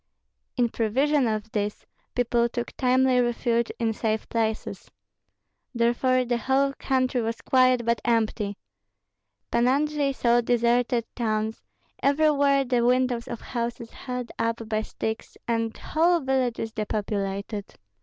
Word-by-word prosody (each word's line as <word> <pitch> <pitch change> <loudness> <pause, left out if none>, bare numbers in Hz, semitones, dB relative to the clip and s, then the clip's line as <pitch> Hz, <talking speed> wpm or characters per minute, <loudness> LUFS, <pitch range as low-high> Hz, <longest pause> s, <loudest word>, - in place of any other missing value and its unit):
In 240 -1 +3
prevision 260 +5 +1
of 215 0 -3
this, 210 -1 -3 0.3
people 235 -1 +2
took 240 0 -5
timely 255 0 +3
refuge 235 -1 0
in 225 -1 0
safe 220 0 -2
places. 220 -1 -2 0.9
Therefore 250 +2 +2
the 240 0 0
whole 275 +3 +1
country 255 -1 +1
was 225 0 -3
quiet, 255 -2 +3
but 235 0 +1
empty. 220 -3 0 0.9
Pan 235 +1 +3
Andrei 290 +1 +1
saw 240 -2 +2
deserted 240 0 +2
towns, 220 -2 -1 0.4
everywhere 280 -1 +3
the 245 -1 +1
windows 250 -1 +1
of 235 - -6
houses 235 -1 -4
held 250 -2 -6
up 230 0 -1
by 215 0 0
sticks, 220 0 -5
and 230 -1 -1
whole 340 +2 +2
villages 255 -4 -1
depopulated. 205 -1 -3
235 Hz, 125 wpm, -26 LUFS, 225-255 Hz, 0.9 s, In